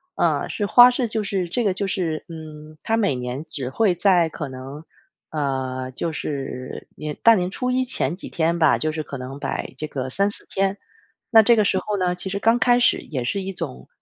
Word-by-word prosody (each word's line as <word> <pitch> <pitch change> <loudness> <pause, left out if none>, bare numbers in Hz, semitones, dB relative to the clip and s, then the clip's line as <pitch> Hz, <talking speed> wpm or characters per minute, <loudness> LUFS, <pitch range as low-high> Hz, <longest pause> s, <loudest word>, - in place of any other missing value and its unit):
啊， - - +1
是 205 - -2
花 245 +3 +8
市， 245 -1 0
就 220 -1 -1
是 190 -3 -2
这 240 +7 0
个 200 -4 +2
就 195 +1 -2
是， 175 -5 -2
嗯， 155 -2 -10
它 225 0 +1
每 200 -11 +1
年 125 +4 -5
只 130 -3 -4
会 195 +3 +2
在 175 -2 +4
可 150 -2 -5
能 135 +4 -8 0.5
呃， 130 -3 -2
就 165 +5 -3
是 135 -3 -5
年 150 -1 -5
大 230 -1 +8
年 180 -1 0
初 250 +5 -2
一 255 +1 +2
前 170 - -1
几 - - -8
天 170 0 0
吧， 160 -2 +5
就 155 0 -1
是 155 - -3
可 140 -2 -7
能 130 +2 -7
摆 - - -4
这 155 +2 -4
个 130 -2 -4
3、4 200 +8 -1
天。 195 +1 0 0.5
那 225 -1 +9
这 235 +2 +5
个 215 - +3
时 190 -1 +2
候 210 -1 -3
呢， 180 -1 +1
其 180 +2 -2
实 200 - -2
刚 230 +3 +3
开 245 0 +4
始 - - +4
也 130 -5 -4
是 195 +11 -1
一 190 0 -5
种， 65 - -6
170 Hz, 230 characters per minute, -23 LUFS, 140-200 Hz, 0.5 s, 那